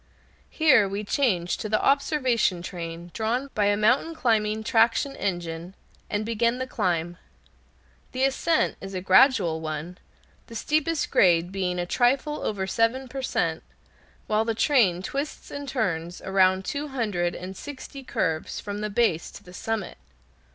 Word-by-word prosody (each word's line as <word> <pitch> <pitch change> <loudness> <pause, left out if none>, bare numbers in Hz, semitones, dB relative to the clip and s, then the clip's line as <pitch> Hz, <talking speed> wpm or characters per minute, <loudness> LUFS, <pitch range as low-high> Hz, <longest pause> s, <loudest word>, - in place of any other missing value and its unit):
Here 265 -11 +4
we 200 +2 -3
change 200 -7 0
to 215 - -5
the 215 - +2
observation 260 - +1
train 170 -1 -7
drawn 245 +5 -1
by 210 - +1
a 205 0 +3
mountain 250 +10 +2
climbing 220 -5 +1
traction 230 +5 +2
engine, 175 -1 -4 0.3
and 210 +1 -1
begin 235 +2 +1
the 260 - -2
climb. 175 -7 -1 0.9
The 260 +1 -1
ascent 275 +4 +1
is 195 0 -7
a 185 - -2
gradual 190 - +4
one, 155 +3 -5 0.5
the 230 - -11
steepest 310 +5 0
grade 175 -1 +4
being 185 -2 -2
a 175 - -1
trifle 265 +9 +1
over 195 -3 -2
seven 230 +6 0
per 270 +1 -5
cent, - - -1 0.6
while 215 +1 +1
the 225 0 -1
train 215 - +3
twists 280 +8 -5
and 285 -1 -6
turns 180 -9 -2
around 190 0 +2
two 290 +8 -3
hundred 210 -10 -1
and 185 +2 -7
sixty 275 +2 -9
curves 160 -10 -2
from 205 0 -5
the 210 - -2
base 200 -6 +1
to - - -13
the 180 - -14
summit. 220 0 -4
215 Hz, 150 wpm, -25 LUFS, 180-260 Hz, 0.9 s, Here